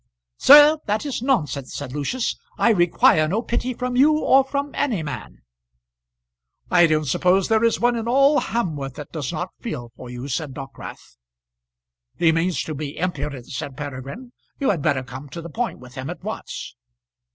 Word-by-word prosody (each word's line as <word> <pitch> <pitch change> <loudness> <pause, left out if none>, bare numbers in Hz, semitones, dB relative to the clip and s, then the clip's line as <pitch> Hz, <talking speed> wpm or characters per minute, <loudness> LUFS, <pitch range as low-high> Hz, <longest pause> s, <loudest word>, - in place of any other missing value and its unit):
"Sir, 295 +2 +8
that 210 +7 0
is 275 -5 -3
nonsense," 150 - -1
said 135 -3 -6
Lucius. 150 - -2 0.2
"I 235 - +4
require 175 -4 +4
no 210 +8 -1
pity 245 +2 -2
from 250 0 -3
you 285 +5 +5
or 270 -3 +4
from 280 +1 -3
any 230 - -1
man." 105 - -7 1.3
"I 175 -1 +6
don't 155 -1 +1
suppose 180 +7 +2
there 220 0 +3
is 230 - +2
one 240 0 +2
in 230 0 -3
all 275 +4 +4
Hamworth 150 - -3
that 150 - -9
does 150 -4 -4
not 175 +3 -4
feel 120 - -6
for 125 - -10
you," 125 +2 -6
said 140 0 -3
Dockwrath. 135 - -10 1.0
"He 165 -2 +4
means 165 +2 0
to 155 - -5
be 145 0 -6
impudent," 150 -7 -3
said 130 0 -5
Peregrine. 145 - -7 0.3
"You 275 -5 +2
had 170 -7 -2
better 140 -3 +1
come 130 +3 -9
to 170 - -7
the 170 0 -8
point 240 +5 -2
with 125 0 -14
him 130 0 -6
at - - -7
once." - - -6
170 Hz, 175 wpm, -22 LUFS, -, 1.3 s, Sir